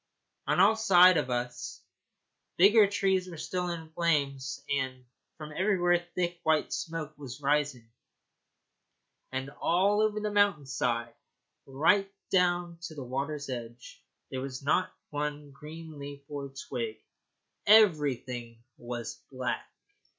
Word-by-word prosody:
On - - +2
all 215 +3 +6
sides 185 -5 +6
of - - -3
us 125 0 -4 0.7
the 180 - +7
bigger 215 -1 +6
trees 190 -2 +1
were 170 - -8
still 180 +3 -2
in 165 -2 -6
flames, 140 -6 0
and 130 -2 -2 0.3
from 155 -1 -8
everywhere 175 0 +2
thick 175 -1 -1
white 160 -1 +1
smoke 160 -2 -4
was 135 -2 -8
rising, 140 -4 0 1.4
and 135 +1 -4
over - - -20
all 205 +5 +3
the 210 0 -3
mountain 205 -8 +3
side, 120 -3 -1 0.5
right 195 +9 +2 0.2
down 175 -2 +2
to 165 -2 -7
the 140 - -6
water's 140 +3 -3
edge, 120 -2 -8 0.3
there 130 - -3
was 130 0 -6
not 145 - +2 0.2
one 145 0 -3
green 155 +2 -10
leaf 140 0 -8
or 140 -2 -5
twig. 120 -4 -5 0.7
Everything 130 - +3 0.2
was 120 -1 -6
black. 125 -2 -3
150 Hz, 130 wpm, -29 LUFS, 130-175 Hz, 1.4 s, the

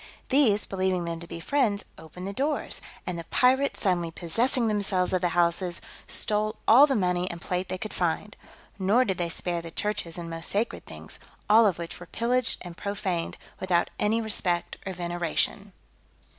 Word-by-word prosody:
These, 255 -7 +4
believing 185 -2 -1
them 165 0 -4
to 170 - -9
be 165 - -7
friends, 210 0 0
opened 170 +4 -9
the 200 - -4
doors; 290 +6 -2 0.2
and 180 -2 -3
the - - -5
pirates, 265 +6 +2
suddenly 175 -4 +1
possessing 230 - +1
themselves 200 -4 +3
of 185 - +2
the 175 - +2
houses, 175 +1 +1 0.3
stole 215 0 0
all 265 +6 +8
the 270 - +1
money 180 -3 +1
and 170 - -6
plate 180 +1 -3
they 185 - -2
could 215 +3 -6
find. 180 +4 -1 0.4
Nor 210 +7 +3
did 190 -5 -2
they 170 -1 0
spare 175 0 -2
the 165 - -8
churches 205 -2 -3
and 170 -1 -5
most 165 0 +1
sacred 215 +4 -2
things; - - -10 0.3
all 220 +1 +7
of 190 - 0
which 170 -1 -7
were 175 - -10
pillaged 245 +3 0
and 175 -2 -8
profaned, 190 -3 -3 0.2
without 175 -2 +1
any 215 +2 +2
respect 185 -5 0
or 190 - -3
veneration. 175 +3 -2
185 Hz, 180 wpm, -27 LUFS, 175-215 Hz, 0.4 s, all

